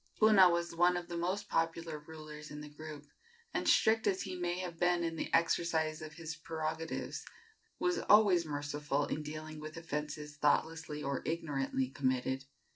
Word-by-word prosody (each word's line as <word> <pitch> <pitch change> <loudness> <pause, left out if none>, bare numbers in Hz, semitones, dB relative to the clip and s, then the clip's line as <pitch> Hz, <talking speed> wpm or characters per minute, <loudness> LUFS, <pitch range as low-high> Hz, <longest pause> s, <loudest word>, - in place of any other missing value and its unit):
Puna 210 -4 +7
was 170 0 -1
one 175 +1 +4
of 175 0 -6
the 170 - -4
most 180 +4 -1
popular 165 -1 -1
rulers 150 0 -10
in 150 0 -7
the 150 - -8
group, 150 -1 -8 0.5
and, - - +1
strict 225 0 +4
as 195 -2 +1
he 185 -1 -5
may 175 0 -1
have 175 -3 -5
been 175 -1 +3
in 165 -1 -1
the - - -3
exercise 165 -1 +2
of 155 -1 -7
his 165 0 -6
prerogatives, 160 0 -4 0.5
was 355 0 +1
always 205 -5 +7
merciful 145 -1 -1
in 155 - -3
dealing 155 +1 -6
with 155 +1 -7
offences 150 -2 -4
thoughtlessly 150 0 +1
or 140 -1 -1
ignorantly 140 -5 -1
committed. 130 0 -1
160 Hz, 165 wpm, -34 LUFS, 150-170 Hz, 0.5 s, Puna